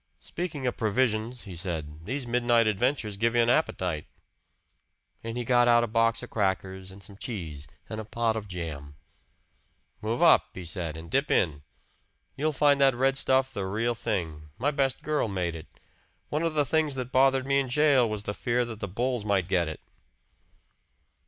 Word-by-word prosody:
"Speaking 160 -6 -5
of 125 - -1
provisions," 115 +1 0
he 95 -4 -8
said, 80 -3 -4
"these 135 0 -3
midnight 120 -1 +3
adventures 110 0 0
give 115 +3 +1
you 120 - +5
an 120 - +3
appetite." 90 - 0 1.2
And 115 +1 -5
he 120 - -2
got 120 0 +4
out 120 0 +5
a - - 0
box 115 +1 +2
of - - -9
crackers 95 -2 -1
and 95 +1 -12
some 100 +1 -13
cheese 80 - -6 0.2
and 110 0 -5
a - - -7
pot 115 +1 -1
of 110 -2 -5
jam. 75 -6 -6 1.1
"Move 115 +9 -1
up," 165 - +6
he 90 - -7
said, 85 -2 -4
"and 80 +1 -10
dip 140 +2 +1
in. 75 -5 +1 0.7
You'll 155 +3 0
find 145 -1 +3
that 135 -2 +5
red 135 +2 +2
stuff 130 0 +2
the 95 -2 -3
real 115 +5 0
thing. 85 -10 -3
My 140 +6 +1
best 135 -3 0
girl 150 -5 0
made 90 -4 -2
it. 80 - -9 0.6
One 150 - -1
of 165 -2 -1
the 145 -1 +3
things 155 -2 +1
that 125 -1 -4
bothered 135 0 +4
me 140 0 +3
in 135 -2 -2
jail 135 -3 +4
was 105 -1 -4
the 105 - -3
fear 120 +2 0
that 110 -2 -8
the 100 - -3
bulls 120 +4 -1
might 100 -4 +1
get 90 -3 +1
it." 80 - -6
115 Hz, 185 wpm, -27 LUFS, 95-130 Hz, 1.2 s, up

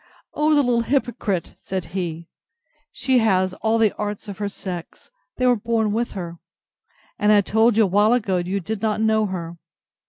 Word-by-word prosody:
O 305 +1 +2
the 290 - +4
little 240 -2 +2
hypocrite! 235 -7 -1
said 185 -3 -4
he; 170 -3 -4 0.6
she 260 -2 +1
has 190 -4 +2
all 220 +1 +2
the 220 -2 +3
arts 210 0 -4
of 200 -1 -7
her 205 -1 -2
sex; 185 - -8 0.3
they 255 - +1
were 250 -1 +5
born 220 -1 0
with 235 +2 -1
her; 170 -3 -6 0.8
and 210 -1 +3
I 205 -1 +6
told 220 +3 +2
you 225 - +6
awhile 205 +3 +3
ago 210 -7 +1
you 180 +3 -1
did 215 +3 -5
not 215 -1 0
know 220 -1 +2
her. 170 -3 -5
210 Hz, 180 wpm, -22 LUFS, 185-230 Hz, 0.8 s, I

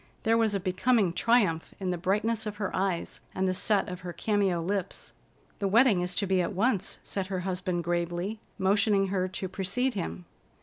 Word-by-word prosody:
There 225 0 +3
was 225 -3 +2
a - - +1
becoming 185 +1 +2
triumph 200 -8 +2
in 185 -2 -1
the - - 0
brightness 210 +5 0
of 210 - -4
her 205 -2 -3
eyes 185 -3 -1 0.2
and 190 0 +1
the 185 - +1
set 205 +2 +1
of 180 -2 -6
her 180 -1 -6
cameo 200 -2 +1
lips. 190 +2 -3 0.5
"The 200 - 0
wedding 220 -2 +5
is 180 0 -2
to 200 - +1
be 190 -1 +2
at 175 - -2
once," 195 -1 0
said 195 -2 -3
her 190 -2 -2
husband 180 -1 -2
gravely, 175 +5 -2 0.2
motioning 195 0 +2
her 185 -1 0
to 185 +1 -4
precede 195 +8 -1
him. 85 - -4
190 Hz, 190 wpm, -28 LUFS, 180-210 Hz, 0.5 s, wedding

